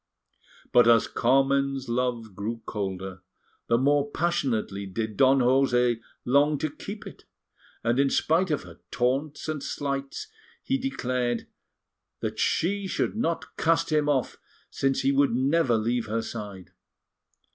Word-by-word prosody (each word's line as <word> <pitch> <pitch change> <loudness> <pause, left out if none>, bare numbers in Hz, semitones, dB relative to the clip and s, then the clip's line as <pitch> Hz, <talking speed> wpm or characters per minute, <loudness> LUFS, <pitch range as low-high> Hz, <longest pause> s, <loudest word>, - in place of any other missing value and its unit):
But 120 -1 +6
as 115 -2 +6
Carmen's 135 +1 +1
love 120 -4 -2
grew 110 +4 -4
colder, 95 -2 -4 0.5
the 115 - +3
more 145 +2 +2
passionately 130 - -1
did 110 +2 -4
Don 135 +4 +5
José 125 -2 +3 0.3
long 145 +4 +3
to 155 +1 -2
keep 205 +7 -8
it, - - -11 0.6
and 120 +3 +1
in 140 0 +4
spite 170 +7 +2
of 150 - -1
her - - -13
taunts 135 +6 -1
and 155 -2 -3
slights, 140 - -4 0.3
he 270 0 0
declared 125 - -1 0.7
that - - -4
she 200 +3 +1
should 190 - -1
not 170 -7 -2
cast 165 0 +2
him 150 -1 +2
off, 135 -4 0 0.3
since 135 0 0
he 135 - +2
would 140 -3 +3
never 135 -1 +2
leave 115 +1 -1
her 115 +1 -1
side. 100 -5 -7
130 Hz, 135 wpm, -26 LUFS, 115-145 Hz, 0.7 s, But